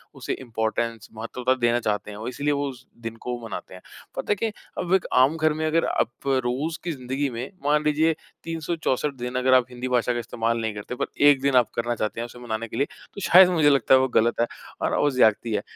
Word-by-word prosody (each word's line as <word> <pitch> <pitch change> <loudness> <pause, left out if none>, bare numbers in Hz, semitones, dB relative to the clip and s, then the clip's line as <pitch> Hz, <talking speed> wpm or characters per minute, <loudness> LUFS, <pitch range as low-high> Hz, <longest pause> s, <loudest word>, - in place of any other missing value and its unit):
उसे - - -3
इम्पॉर्टेंस 115 -1 -2
महत्वता 125 +3 -1
देना 120 +1 +3
चाहते 105 -1 -2
हैं 105 - -9
और 115 +3 -4
इसलिए 145 +4 -1
वो 140 0 -1
उस 130 -1 -11 0.2
दिन 115 0 -5
को 125 0 -3
मनाते 115 -5 -7
हैं। 90 - -11 0.3
पता - - -2
है - - +4
क्या, 225 +3 -1 0.3
अब 180 +1 -1
एक 190 - +1
आम 130 +5 +5
घर 155 -1 +2
में 155 +1 -2
अगर 160 +1 +2
आप 120 +4 -2
रोज़ 135 +5 0
की 175 - -2
ज़िंदगी 135 +1 -2
में, 120 +5 -6
मान 150 +1 +3
लीजिए 155 +2 +3 0.3
364 160 -3 -2
दिन 125 0 -5
अगर 130 0 +3
आप 130 -1 +5
हिंदी 125 +1 -5
भाषा 125 -1 +1
का 120 - -2
इस्तेमाल 115 0 -1
नहीं 110 -1 -2
करते 105 +4 -6
पर - - -1 0.2
1 135 -2 +4
दिन 140 -1 +2
आप 125 -2 +5
करना 120 0 -1
चाहते 110 +1 -3
हैं 120 - -2
उसे 120 +1 -12
मनाने 115 -1 -4
के 115 - -7
लिए 140 - +2 0.3
तो 200 - -8
शायद 185 0 +7
मुझे 155 -4 +4
लगता 135 -2 +3
है 130 - +8
वो 130 - +2
गलत 120 -1 +2
है, 120 - +2 0.3
और - - +1
वो 145 - +3
ज़्यादती 115 -3 +3
है। 100 - 0
125 Hz, 240 wpm, -24 LUFS, 115-145 Hz, 0.3 s, है